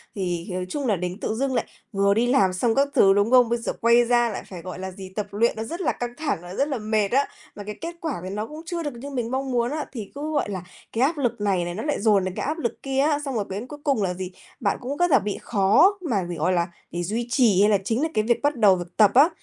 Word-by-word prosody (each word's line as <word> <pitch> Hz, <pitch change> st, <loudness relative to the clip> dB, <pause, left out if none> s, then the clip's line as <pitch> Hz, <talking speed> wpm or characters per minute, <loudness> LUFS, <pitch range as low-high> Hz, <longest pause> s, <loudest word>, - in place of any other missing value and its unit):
thì 175 Hz, -3 st, -2 dB
nói 180 Hz, 0 st, -2 dB
chung 280 Hz, +5 st, -2 dB
là 210 Hz, -, +3 dB
đến 180 Hz, +2 st, -4 dB
tự -, -, -2 dB
dưng 265 Hz, +3 st, -1 dB
lại 240 Hz, -, 0 dB, 0.3 s
vừa 200 Hz, -1 st, +3 dB
đi 230 Hz, +4 st, +2 dB
làm 200 Hz, -8 st, +3 dB
xong 225 Hz, +5 st, +1 dB
các 275 Hz, +1 st, +3 dB
thứ, 195 Hz, -1 st, +6 dB
đúng 205 Hz, +3 st, +2 dB
không? 250 Hz, -2 st, +6 dB
Bây 235 Hz, -, +1 dB
giờ 230 Hz, -, -3 dB
quay 235 Hz, +1 st, +5 dB
ra 240 Hz, 0 st, +3 dB
lại 210 Hz, -, -5 dB
phải, 180 Hz, -3 st, -8 dB
gọi 180 Hz, +1 st, -7 dB
là 190 Hz, 0 st, -5 dB
gì, 190 Hz, 0 st, -9 dB
tập 210 Hz, -1 st, -2 dB
luyện 225 Hz, +4 st, +2 dB
nó 220 Hz, -, -3 dB
rất 335 Hz, +11 st, -5 dB
là -, -, +2 dB
căng 240 Hz, 0 st, -5 dB
thẳng, 305 Hz, -, -1 dB, 0.2 s
rất 280 Hz, -, +2 dB
là 280 Hz, -3 st, -2 dB
mệt 215 Hz, -1 st, 0 dB
á, 275 Hz, +3 st, +3 dB, 0.3 s
mà 205 Hz, -, -7 dB
cái 210 Hz, +1 st, -6 dB
kết 335 Hz, +1 st, -5 dB
quả 320 Hz, -4 st, -2 dB
thì 185 Hz, -, -5 dB
nó 210 Hz, +3 st, -3 dB
cũng 305 Hz, +1 st, -9 dB
chưa 340 Hz, 0 st, -3 dB
được 290 Hz, -, -3 dB
như 245 Hz, +4 st, -8 dB
mình 245 Hz, -4 st, -3 dB
mong 265 Hz, 0 st, -2 dB
muốn 240 Hz, 0 st, +1 dB
á, 305 Hz, 0 st, -2 dB
thì 220 Hz, -6 st, -7 dB
cứ 300 Hz, +2 st, -4 dB
gọi 290 Hz, -7 st, 0 dB
là 190 Hz, -3 st, -4 dB, 0.3 s
cái 230 Hz, -, -2 dB
áp 305 Hz, +4 st, +1 dB
lực 245 Hz, -6 st, -1 dB
này 190 Hz, -4 st, +1 dB
này 175 Hz, 0 st, -4 dB
nó 215 Hz, -, -4 dB
lại 295 Hz, -, -1 dB
dồn 205 Hz, -3 st, +4 dB
đến 185 Hz, 0 st, -4 dB
cái -, -, -3 dB
áp 305 Hz, +3 st, -2 dB
lực 235 Hz, -8 st, -4 dB
kia 270 Hz, -1 st, -1 dB
á. 290 Hz, +1 st, +3 dB
Xong 270 Hz, -2 st, -3 dB
rồi 210 Hz, -3 st, 0 dB
đến 200 Hz, +6 st, -5 dB
cuối 295 Hz, +1 st, -9 dB
cùng 275 Hz, -8 st, +1 dB
là 180 Hz, -2 st, 0 dB
gì, 185 Hz, 0 st, -6 dB, 0.3 s
bạn 205 Hz, -6 st, 0 dB
cũng 265 Hz, +3 st, -4 dB
rất 350 Hz, 0 st, +2 dB
là 270 Hz, -, +6 dB
bị 205 Hz, 0 st, -3 dB
khó 240 Hz, -, +4 dB
mà 200 Hz, -6 st, +1 dB
để, 175 Hz, -, -3 dB
gọi 170 Hz, +3 st, +1 dB
là, 170 Hz, -1 st, +1 dB, 0.2 s
để 175 Hz, 0 st, -3 dB
duy 225 Hz, +6 st, -2 dB
trì 230 Hz, -7 st, +4 dB
hay 205 Hz, -, +5 dB
là 205 Hz, -, +4 dB
chính 225 Hz, +6 st, 0 dB
là 320 Hz, -, +1 dB
cái 215 Hz, -, +2 dB
việc 235 Hz, +1 st, +1 dB
bắt 290 Hz, +1 st, +2 dB
đầu 210 Hz, -5 st, +5 dB
việc 175 Hz, -1 st, -8 dB
tập 210 Hz, -3 st, +6 dB
á. 280 Hz, +6 st, +7 dB
230 Hz, 305 wpm, -24 LUFS, 195-270 Hz, 0.3 s, á